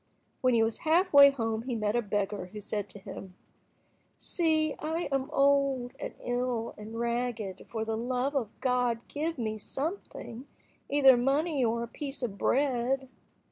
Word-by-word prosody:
When 255 -2 +3
he 225 - +4
was 225 0 -1
half 345 +4 +2
way 280 0 +10
home 225 -5 -2
he 245 0 -3
met 215 0 0
a 240 - +3
beggar, 205 -2 -2
who 210 +3 -9
said 205 0 -3
to - - -9
him— 190 -1 -9 0.8
"See, 315 -3 +1
I 320 +3 -2
am 270 -1 0
old, 275 -3 +2 0.3
ill, 245 -2 -1
and 215 +2 -8
ragged, 235 -5 -2
for 220 -1 -3
the 220 0 -1
love 250 +4 -1
of 240 -7 0
God 250 -3 +1
give 315 +2 -3
me 220 -3 -3
something, 275 - -5 0.4
either 275 -2 +7
money 275 +3 +1
or 235 0 +1
a - - -5
piece 275 +1 -5
of 220 -5 -2
bread." 265 -1 +1
245 Hz, 160 wpm, -29 LUFS, 225-280 Hz, 0.8 s, way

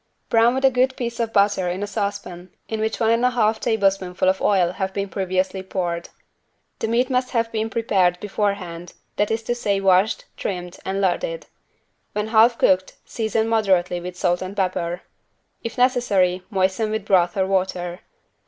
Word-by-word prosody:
Brown 230 +2 +4
with 265 +1 +1
a 265 - +6
good 260 +1 +2
piece 235 -1 -4
of 230 -1 -1
butter 200 -3 +2
in 185 +3 -3
a - - 0
saucepan 200 -4 -4 0.2
in 220 - -3
which 220 0 -1
one 225 -1 +3
and 230 +1 +2
a 250 - +5
half 225 -3 +1
tablespoonful 195 -4 +1
of 190 0 +2
oil 185 -4 +3
have 190 0 -4
been 200 0 -1
previously 190 0 -1
poured. 175 -3 -3 0.7
The - - -1
meat 245 +3 +1
must 255 0 +1
have 230 -2 0
been 220 0 -2
prepared 190 -6 +1
beforehand, 190 -4 -3 0.2
that 205 - +1
is 225 0 -1
to 240 - -1
say 205 -5 0
washed, 195 +2 +2
trimmed 180 -2 -4
and 195 +1 -1
larded. - - -1 0.7
When 210 +1 -2
half 230 +1 +5
cooked, 185 0 +2
season 220 0 -1
moderately 190 -6 +1
with 180 0 -7
salt 175 -1 +1
and 190 +2 -6
pepper. 180 -2 -1 0.6
If 230 - -5
necessary, 205 -8 +2
moisten 195 +2 0
with 215 -2 -3
broth 185 -1 +2
or 190 - +2
water. 185 -2 -1
200 Hz, 175 wpm, -22 LUFS, 185-225 Hz, 0.7 s, a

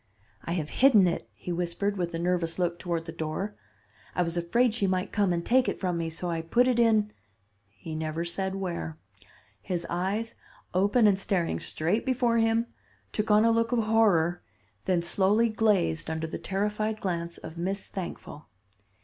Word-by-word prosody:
'I 170 - -2
have 155 -4 -2
hidden 245 -8 +6
it,' 170 - -2
he 180 - -7
whispered, 180 +4 -1
with 175 -3 -2
a - - -1
nervous 170 -1 -1
look 175 -1 -1
toward 170 -2 -2
the 165 - -6
door: 165 +7 -4 0.6
'I 180 - +2
was 170 0 -3
afraid 215 +8 +2
she 210 -4 0
might 185 -1 -1
come 200 -3 +2
and 170 -1 -1
take 255 +1 +3
it - - -4
from 180 -3 -1
me, 165 -1 -2
so 165 +2 -5
I 165 -1 -1
put 240 +10 +2
it 250 -2 +2
in 220 -3 +3 0.3
' 100 0 -43
He 160 +10 -9
never 160 +1 -3
said 190 +3 -2
where. 175 -4 -4 0.6
His 175 - -3
eyes, 195 +6 -1 0.4
open 205 +6 +3
and 200 -2 +4
staring 185 -4 0
straight 175 +8 -1
before 245 -3 +2
him, 225 +1 +2 0.5
took 215 0 -2
on 210 +1 +5
a 230 - +5
look 230 +1 +1
of 235 -2 +2
horror, 195 -6 +3 0.4
then 180 -2 +1
slowly 200 +6 +3
glazed 210 - +1
under 160 0 -2
the 160 - -5
terrified 210 +2 -1
glance 170 -3 -3
of 160 0 -9
Miss 190 +3 -2
Thankful. 175 -5 -7
185 Hz, 185 wpm, -28 LUFS, 170-215 Hz, 0.6 s, hidden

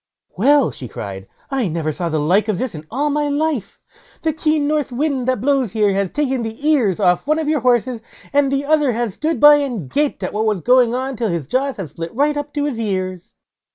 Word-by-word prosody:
"Well!" 285 -2 +4
she 125 - -7
cried, 95 -3 -7 0.2
"I 265 -6 0
never 160 -2 -2
saw 170 +3 -3
the 160 - -1
like 185 +9 +2
of 210 -4 0
this 255 +3 -3
in 155 -1 -9
all 290 +5 -1
my 295 0 0
life; 290 -5 -1 0.5
the 320 -1 +1
keen 305 -1 +1
north 300 -3 0
wind 265 -1 -1
that 255 -5 0
blows 265 -5 +1
here 210 -3 +2
has 195 -1 0
taken 265 -1 -1
the 225 +6 -4
ears 240 - +2
off 180 +3 +2
one 305 +1 +2
of 320 -2 -2
your 305 -1 +2
horses, 245 -1 +1 0.3
and 280 -1 +3
the 275 +1 0
other 295 -4 +2
has 230 -3 -2
stood 310 - -2
by 295 +2 +8
and 240 - -3
gaped 295 0 0
at - - -3
what 215 +1 0
was 210 -5 0
going 245 +1 +4
on 260 0 -3
till 225 -1 -1
his 170 -5 -2
jaws 265 - -1
have 185 -8 -6
split 165 +3 -7
right 295 +3 +2
up 290 0 -4
to 290 -1 0
his 265 -6 -3
ears." 185 -4 -3
255 Hz, 230 wpm, -19 LUFS, 200-290 Hz, 0.5 s, by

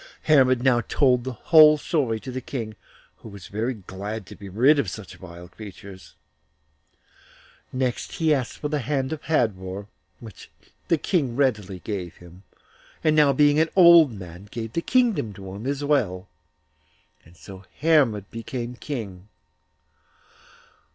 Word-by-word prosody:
Hermod 130 -5 +4
now 125 -3 +3
told 125 -4 +2
the 130 0 -5
whole 155 +5 +6
story 135 -7 -1
to 130 - -7
the 130 +1 -5
King, 115 -4 -6 0.4
who - - -12
was 100 -3 -11
very 115 +5 -3
glad 100 +2 -7
to - - -12
be 100 -1 -11
rid 130 +10 +4
of 115 -9 -1
such 95 0 -9
vile 85 -1 -11
creatures. 95 -5 -12 1.6
Next 130 -1 -3
he 160 -2 +2
asked 130 -5 -3
for 150 - -4
the 150 0 -2
hand 135 +2 -2
of 155 - -7
Hadvor, 100 -9 -1 0.3
which 110 -5 -12 0.4
the 165 - +2
King 145 -6 -1
readily 105 -9 -1
gave 95 -5 -5
him, 90 +1 -16 0.6
and 155 -1 +3 0.2
being 145 0 +4
now - - +4
an 160 - +1
old 170 -6 +7
man, 95 -2 -10
gave 115 0 -6
the 170 - -1
kingdom 230 - +1
to 95 -1 -10
him 105 +6 -7
as 140 +1 -2
well; 105 -11 0 1.0
and 85 +2 -20
so 95 +1 -12 0.2
Hermod 140 - +2
became 120 +1 -6
King. 105 -8 -7
120 Hz, 150 wpm, -24 LUFS, 100-145 Hz, 1.6 s, old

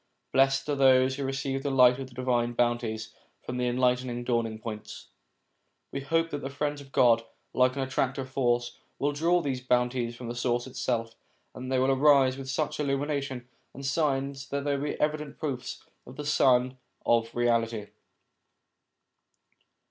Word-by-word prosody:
Blessed 135 +1 +3
are 145 - 0
those 130 -1 +4
who 140 - -3
receive 135 0 -2
the 140 - -2
light 125 -1 +5
of 135 - -5
the 120 - -17
divine 120 -2 0
bounties 120 -2 -1 0.3
from 125 - -5
the 125 0 0
enlightened 125 0 0
Dawning 115 -3 0
points! 110 -1 -8 0.8
We 140 - -4
hope 165 +4 0
that 145 - -3
the 135 - -4
Friends 145 +1 -3
of 135 -1 -15
God, 115 -3 +4 0.3
like 130 +1 +3
an 135 - -1
attractive 130 0 -1
force, 120 -2 0 0.2
will 145 +1 0
draw 170 +4 +2
these 135 -5 -2
bounties 125 -1 0
from 120 0 -8
the 120 - -3
source 120 0 -1
itself, 115 -3 -2 0.4
and 125 - -8
that - - +2
they - - +3
will 130 +1 +3
arise 135 -1 +5
with 135 -1 -7
such 150 +3 -2
illumination 140 -3 -2 0.3
and 135 +1 -7
signs 135 -2 -1
that 140 0 -2
they 145 -1 +1
will 140 +1 -2
be 150 - -3
evident 150 -1 -1
proofs 130 -5 -4 0.2
of 125 - -11
the 150 - -6
Sun 130 -3 +3 0.3
of 115 -1 +3
Reality. 115 -3 0
130 Hz, 170 wpm, -28 LUFS, 120-140 Hz, 0.8 s, light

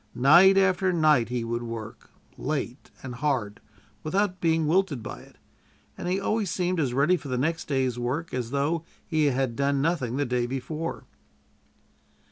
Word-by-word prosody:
Night 175 +9 +6
after 190 -1 +3
night 155 -8 +3
he 125 -1 -2
would 120 +1 -3
work 115 -2 -7 0.3
late 140 -2 -4
and 130 -2 -6
hard 125 -6 -2 0.4
without 185 - -1
being 160 -1 +2
wilted 155 - +1
by - - -7
it, - - -18 0.6
and - - -6
he 185 +2 0
always 210 0 -1
seemed 180 0 -1
as 135 -5 0
ready 140 +8 +3
for 160 - -7
the 130 -2 -2
next 165 +6 -1
day's 130 -4 0
work 135 +8 -3
as 125 -2 -2
though 145 +5 0 0.2
he 155 -3 +1
had 130 -3 0
done 140 +1 +1
nothing 135 -5 0
the 145 - +1
day 125 -1 0
before. 155 +6 -5
145 Hz, 165 wpm, -26 LUFS, 125-170 Hz, 0.6 s, Night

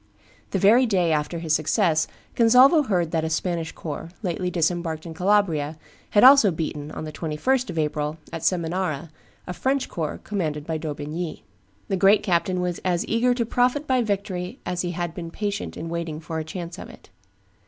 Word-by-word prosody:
The - - -1
very 225 +7 +5
day 180 -6 +2
after 150 +2 -1
his 165 -2 -1
success 155 +1 +2 0.3
Gonzalvo 250 +7 +6
heard 175 -5 +1
that 160 -2 0
a 160 - -1
Spanish 165 0 -2
corps, 160 +1 -6
lately 180 0 -1
disembarked 170 -2 -1
in 165 - -7
Calabria, 165 -5 +1 0.3
had 205 - +4
also 265 -5 +8
beaten, 155 -3 -4
on - - -5
the 155 - -6
21st 180 - -1
of - - -5
April, 150 0 -1 0.2
at 165 - -4
Seminara, 170 -3 -1 0.3
a 180 - -5
French 265 +7 -1
corps 160 -3 -4
commanded 155 -8 -3
by 160 -1 -2
D'Aubigny. 155 +2 -5 0.4
The 195 - 0
great 195 +3 +5
captain 180 -1 +1
was 180 -1 -2
as 175 -2 0
eager 245 +2 +2
to 235 -2 0
profit 250 +5 +1
by 260 -3 +2
victory 200 -1 -3
as 180 -1 -2
he 175 -1 -3
had 175 -1 -3
been 170 -1 -6
patient 205 +3 -4
in 165 - -5
waiting 165 -2 -4
for 160 0 -5
a - - -3
chance 170 +2 -7
of - - -9
it. - - -16
175 Hz, 185 wpm, -24 LUFS, 160-205 Hz, 0.4 s, also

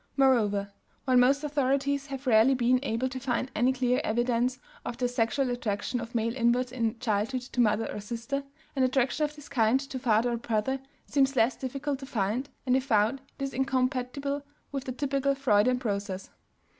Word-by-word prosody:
Moreover, 210 -7 +3 0.3
while 260 -2 +3
most 270 +4 +4
authorities 280 -1 0
have 270 0 -6
rarely 245 +2 +5
been 250 0 +3
able 255 -1 -1
to 260 0 -5
find 255 0 -1
any 245 +4 +3
clear 250 -1 +1
evidence 240 +2 +1 0.3
of 235 - -5
the 250 -1 +1
sexual 245 +2 0
attraction 245 0 -2
of 230 +1 -8
male 230 +1 0
inverts 245 0 +2
in 235 -2 -1
childhood 230 +2 -1
to 245 0 -1
mother 215 -1 +2
or - - -4
sister, 235 +6 -4 0.3
an 270 - +1
attraction 265 +3 +2
of 300 0 -6
this 295 -1 -12
kind 240 -1 +3
to 270 -1 -6
father 235 0 +2
or 235 - -1
brother 230 +3 -1 0.3
seems 275 -1 +2
less 230 0 +3
difficult 275 +1 -3
to 270 - -8
find, 230 +5 -1 0.2
and 255 -1 +3
if 265 0 +1
found 225 +1 +2 0.2
it - - -4
is 275 -1 -3
incompatible 265 +2 -1 0.3
with 275 -2 -4
the 255 - -3
typical 275 +1 0
Freudian 250 -2 +3
process. 200 -5 -3
255 Hz, 180 wpm, -28 LUFS, 230-270 Hz, 0.3 s, rarely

